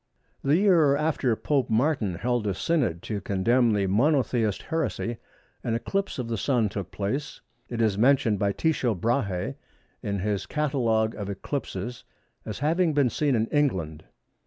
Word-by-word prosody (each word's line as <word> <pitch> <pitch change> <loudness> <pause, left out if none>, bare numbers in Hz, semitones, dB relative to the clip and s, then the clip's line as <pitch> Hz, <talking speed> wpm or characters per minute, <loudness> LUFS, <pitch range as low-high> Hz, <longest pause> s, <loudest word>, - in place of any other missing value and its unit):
The 145 +4 +3
year 170 -8 +4
after 145 -5 +1
Pope 140 +3 0
Martin 115 - +1
held 120 +2 -1
a 100 - 0
Synod 125 - 0
to 105 -3 -3
condemn 115 +5 +2
the 100 -2 +1
Monothelite 120 0 +1
heresy, 160 -7 -2 0.5
an 115 - 0
eclipse 195 +11 -2
of 125 -3 -3
the 115 -2 -2
Sun 120 -5 +1
took 100 -3 -5
place. 110 +9 -3 0.3
It 115 -1 -1
is 105 -2 +1
mentioned 120 -4 +3
by 100 -1 +2
Tycho 130 -3 0
Brahe 115 +2 -1 0.5
in 100 -4 -2
his 100 +1 -2
catalogue 120 -7 +1
of 100 -1 -5
eclipses 110 +1 -4 0.4
as 105 - -4
having 165 +1 +2
been 135 -5 +3
seen 145 -4 +1
in 110 -1 +2
England. 90 - 0
120 Hz, 155 wpm, -26 LUFS, 100-140 Hz, 0.5 s, year